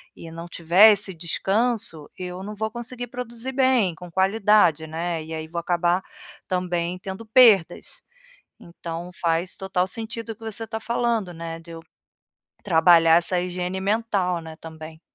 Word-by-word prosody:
e 165 - -10
não 165 +1 -8
tiver 175 +6 +6
esse 200 -1 -1
descanso, 190 0 -1
eu 180 0 -6
não 210 +2 -6
vou 220 +1 -3
conseguir 245 +1 -6
produzir 245 +1 -5
bem, 255 -9 +2
com 175 +1 -11
qualidade, 190 -4 +3
né, 165 +1 -3
e 160 +1 -8
aí 160 0 -5
vou 170 +2 -4
acabar 175 +1 0 0.4
também 180 -1 -2
tendo 190 +4 -7
perdas. 225 - +4 0.6
Então, 170 0 -7
faz 170 +1 -1
total 190 -1 -1
sentido 225 +2 -6
o - - -13
que 225 - -23
você 225 +1 -5
tá 220 0 -4
falando, 235 -4 -1
né, 165 0 -7
de 165 +1 -15
eu 165 0 -8 0.8
trabalhar 165 -2 +5
essa 175 +1 +1
higiene 180 +1 -3
mental, 200 -4 0
né, 160 -1 -10
também. 160 0 -11
180 Hz, 155 wpm, -24 LUFS, 170-220 Hz, 0.8 s, tiver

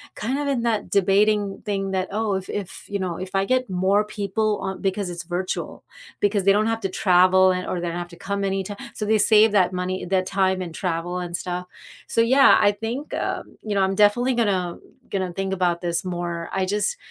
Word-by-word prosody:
kind 255 +6 -2
of 290 0 -2
in 255 -4 0
that 225 -3 -1
debating 200 +1 +2
thing 195 -2 -2
that, 190 -1 -1
"Oh, 215 0 -1
if 190 -1 -5
if 200 -3 -6
you 200 0 -2
know, 180 -3 -2
if 185 0 -7
I 195 0 +1
get 255 0 0
more 190 +3 +2
people 210 0 -1
on" 190 0 -4
Because 195 -1 -1
it's 175 0 -6
virtual. 180 +2 -4 0.4
Because 205 -1 +1
they 195 - +5
don't 210 +2 +3
have 225 0 -1
to 195 - -2
travel 185 0 +4
and 180 0 -2
or 180 - -3
they 175 - -3
don't 170 0 -3
have 175 0 -5
to 170 - -13
come 200 +2 -3
any 195 0 -1
ti 205 +2 -6 0.2
so 210 - -4
they 220 +1 +3
save 215 +1 +5
that 185 -3 +4
money, 185 0 -3
that 185 +1 +1
time 190 -1 +1
and 170 -3 -6
travel 175 0 -2
and 175 -1 -4
stuff, 180 0 -4 0.4
so, - - -1
yeah, 260 +4 +6
I 205 - +4
think, 225 +7 -5
um, - - -4
you 215 - -4
know, 195 - +2
I'm 190 0 +1
definitely 225 +6 +3
gonna 190 -7 0 0.3
gonna 185 -2 -2
think 195 +1 -2
about 175 -2 +1
this 170 -2 -1
more. 175 -2 -4
I 190 -1 0
just 210 - -1
195 Hz, 225 wpm, -23 LUFS, 180-210 Hz, 0.4 s, yeah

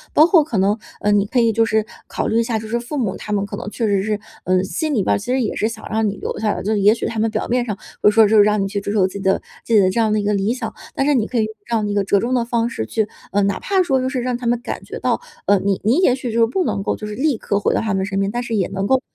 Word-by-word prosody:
包 310 - +8
括 340 -4 +5
可 245 -8 -3
能 200 +3 +2 0.2
呃， 210 - +2
你 205 -1 +3
可 250 - +1
以 230 -1 +4
就 225 +1 +2
是 220 -1 +1 0.2
考 - - -3
虑 225 - +2
一 230 - +3
下 230 -1 -1
就 220 - -8
是 235 +2 -1
父 240 +5 -5
母， 210 -8 -1
他 210 - -7
们 200 -1 0
可 200 - -6
能 205 - -5
确 230 +2 -2
实 200 -1 +2
是， 210 0 -1 0.3
呃， 185 0 +2
心 305 - -2
里 210 - +1
边 - - +2
其 205 - -9
实 265 - +2
也 225 - -2
是 215 - +1
想 225 -1 -8
让 220 -1 +1
你 200 - -6
留 - - -4
下 215 -1 +1
来。 - - -5
就 210 - -1
是 210 - +1
也 210 +3 +5
许 - - -4
他 225 - -3
们 225 +1 +2
表 - - -2
面 245 +1 +1
上 210 -4 -4 0.2
会 - - +6
说 220 0 +6
就 215 +1 +3
是 205 - +8
让 210 0 +2
你 195 - 0
去 200 0 -3
追 205 - -3
求 200 -3 +3
自 190 - -11
己 200 - -5
的 195 0 +1 0.3
自 230 - -2
己 - - +7
的 185 -2 +4
这 230 - -1
样 220 -1 +2
的 215 - +2
一 - - -2
个 210 +1 +1
理 200 +2 +1
想， 255 - -5 0.2
但 270 - +1
是 295 - +3
你 225 -4 +1
可 250 - -3
以 220 - +3
用 220 - -7
这 235 - -1
样 215 -2 0
一 205 - -2
个 200 - +1
折 200 +1 +2
中 240 +5 -1
的 245 -2 +2
方 235 -1 0
式 110 - -4
去 220 -2 0 0.2
呃， 200 0 +2
哪 200 - 0
怕 385 -2 +1
说 270 -7 +1
就 260 - -1
是 260 -1 -2
让 250 0 -1
他 245 - -4
们 240 0 +2
感 - - -5
觉 - - -7
到 - - 0 0.3
呃， 200 -1 +4
你 195 0 0
你 225 +7 +3
也 260 -9 +4
许 260 - -13
就 230 - 0
是 - - +6
不 365 +11 0
能 195 - -1
够 - - -1
就 215 - -7
是 210 - -6
立 275 -1 +1
刻 200 -1 -1
回 - - +1
到 - - +1
他 215 -3 -1
们 190 0 0
身 195 0 -2
边， 195 +1 0
但 240 - -2
是 230 -1 -3
也 195 -4 +1
能 195 +1 -2
够 265 -1 +3
215 Hz, 385 characters per minute, -20 LUFS, 200-240 Hz, 0.3 s, 包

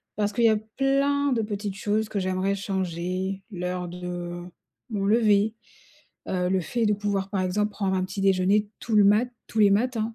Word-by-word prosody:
Parce 205 0 0
qu'il 235 +2 +2
y 225 - +7
a 215 - +4
plein 275 +5 +1
de 230 - +1
petites 205 -2 -4
choses 210 +2 0
que 210 - -3
j'aimerais 185 +1 0
changer, 190 0 -3
l'heure 180 -1 -3
de 175 0 -5 0.5
mon 200 -3 -2
lever, 215 0 +3 0.7
heu, 180 -1 0
le 190 0 +1
fait 235 +7 -1
de 210 - +3
pouvoir, 200 -1 -2
par 195 - -1
exemple, 210 +3 0
prendre 195 -2 -1
un 185 - +1
petit 185 +2 -5
déjeuner 195 +2 +3
tout 225 -2 -1
le 205 - +7
mat 210 +5 +4 0.2
tous 220 - -1
les 205 - +6
matins. 225 +1 0
200 Hz, 190 wpm, -25 LUFS, 185-215 Hz, 0.7 s, y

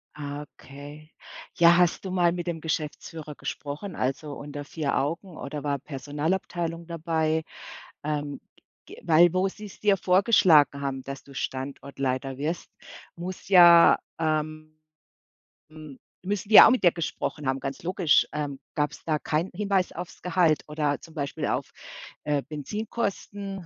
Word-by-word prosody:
Ah, 145 -1 -5
okay, 145 +3 -12 0.4
ja, 170 0 +6
hast 180 +1 +2
du 190 - -5
mal 175 -2 +3
mit 175 0 -5
dem 165 -2 -3
Geschäftsführer 155 -1 -5
gesprochen, 150 +6 -6
also 135 +3 -2
unter 145 0 -7
4 150 -1 -2
Augen, 165 +5 -3
oder 145 0 -6
war 145 -1 0
Personalabteilung 165 +5 -3
dabei? 160 -1 -1 0.6
Ähm, 145 -1 -3 0.4
ge - - -12
weil, 170 +1 +5
wo 185 +1 +2
sie's 205 +1 -10
dir 205 -2 +3
vorgeschlagen 180 -7 +4
haben, 135 -2 -3
dass 140 0 -7
du 140 - -15
Standortleiter 135 -1 -4
wirst, 155 +5 -3 0.5
muss 180 +2 -7
ja 175 -3 +8 0.2
ähm, 155 0 -2 0.9
hm, 155 -3 -12 0.2
müssen 200 +1 -3
die 220 - +4
ja - - +12
auch - - +5
mit 250 - +1
dir 175 - +6
gesprochen 155 -3 -4
haben, 135 0 0
ganz 135 +2 -6
logisch, 180 -2 +3
ähm, 145 -2 -4 0.2
gab's 150 0 -2
da 155 -2 0
keinen 160 +6 -1
Hinweis 195 -2 0
aufs 175 +1 -8
Gehalt 170 -3 +2
oder 150 -2 -1
zum 165 -1 -15
Beispiel 140 -2 -3
auf, - - -2 0.5
äh, 145 -2 0
Benzinkosten 200 - -4
155 Hz, 145 wpm, -26 LUFS, 145-180 Hz, 0.9 s, ja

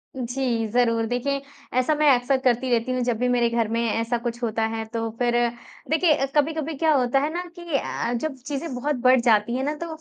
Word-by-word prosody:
जी, 245 -2 -1
ज़रूर 230 -1 +2
देखिए, 255 +4 -1 0.4
ऐसा 255 +5 +2
मैं 300 0 +4
अक़्सर 250 +1 +2
करती 250 0 +2
रहती 235 +1 +1
हूँ 255 0 -1
जब 240 -2 0
भी 250 +2 0
मेरे 240 -1 +2
घर 235 -1 0
में 230 +2 -1
ऐसा 230 +2 0
कुछ 235 0 -5
होता 225 -1 0
है, 225 0 -3
तो 225 0 -3
फिर 240 -1 +1 0.6
देखिए 315 -3 +3
कभी-कभी 315 +1 0
क्या 315 +3 +2
होता 260 -1 +2
है 290 +2 0
ना 350 +1 -2
कि 340 -4 -2
अ, 235 -2 -3
जब 275 +4 -2
चीज़ें 290 +1 -4
बहुत 285 +4 -1
बढ़ 255 0 +6
जाती 230 -1 +3
हैं 260 - -1
ना, 295 +2 -1
तो 335 +3 -6
250 Hz, 215 wpm, -24 LUFS, 235-280 Hz, 0.6 s, बढ़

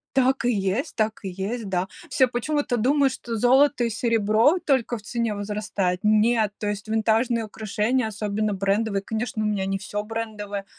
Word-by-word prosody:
Так 265 0 +3
и 245 - +3
есть 205 - -1
так 220 0 0
и 195 - -3
есть, 200 +4 -4
да. 185 0 0 0.2
Все 260 -1 +3
почему-то 250 +2 -1
думают, 270 +3 +3
что 235 -3 -5
золото 260 +2 +4
и - - 0
серебро 225 - +3
только 260 -6 0
в - - -11
цене 230 +1 -2
возрастает. 200 -3 -2
Нет, 215 0 +3
то 210 - -4
есть 205 0 -3
винтажные 225 +1 +1
украшения, 220 +3 -1
особенно 210 0 -2
брендовые, 200 +1 0
конечно, 220 +1 -3
у - - 0
меня 200 -2 -1
не 195 0 -1
всё 205 +1 -4
брендовое, 210 -2 -5
220 Hz, 170 wpm, -24 LUFS, 205-240 Hz, 0.2 s, золото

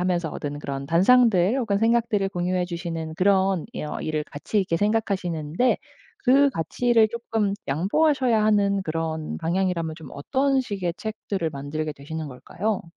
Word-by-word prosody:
하면서 175 -3 0
얻은 145 0 -5
그런 140 -1 -5
단상들 195 - +4
혹은 205 -5 0
생각들을 225 -3 +2
공유해 180 0 -1
주시는 170 -2 -5
그런 190 -1 +2 0.2
어 - - -5
일을 155 -1 -2
가치 180 +8 -3
있게 170 -3 0
생각하시는데 195 -2 0 0.5
그 275 +2 +5
가치를 225 - +2
쪼끔 225 -4 -1
양보하셔야 235 - +2
하는 200 -2 +2
그런 160 -1 -3
방향이라면 170 -1 -1
좀 160 - -10
어떤 270 - +1
식의 195 -8 -3
책들을 205 -5 -3
만들게 150 +2 -4
되시는 155 +2 -6
걸까요? 190 - -3
185 Hz, 340 characters per minute, -24 LUFS, 160-220 Hz, 0.5 s, 그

